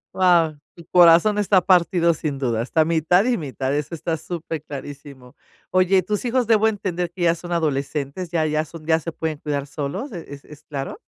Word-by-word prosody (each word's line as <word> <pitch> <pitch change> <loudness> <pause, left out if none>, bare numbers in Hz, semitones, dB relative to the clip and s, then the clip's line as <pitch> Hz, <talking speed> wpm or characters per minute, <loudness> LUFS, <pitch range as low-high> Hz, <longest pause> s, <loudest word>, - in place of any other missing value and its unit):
Guau, 170 -4 +3 0.2
tu 170 -2 -14
corazón 175 +4 +6
está 200 -2 +4
partido 175 -2 +3
sin 150 -3 -4
duda, 120 -4 -1
está 155 +6 +1
mitad 170 +5 +2
y 250 -2 +1
mitad, 135 -2 -3
eso 150 +3 -3
está 165 0 -2
super 160 -1 -6
clarísimo. 140 -3 -10 0.4
Oye, 185 0 +3
¿tus 210 +4 -2
hijos 245 -1 0
debo 220 -1 +4
entender 180 -4 -3
que 175 -1 -5
ya 170 0 +3
son 175 +1 -10
adolescentes, 150 +1 -2
ya 160 -2 +1
ya 155 0 0
son 155 0 -12
ya 160 0 +3
se 165 - -5
pueden 160 -2 -4
cuidar 145 -1 -3
solos, 145 - -5
es 170 - -7
es 140 -1 -10
es 150 0 -14
claro? 145 - -6
165 Hz, 195 wpm, -22 LUFS, 145-180 Hz, 0.4 s, corazón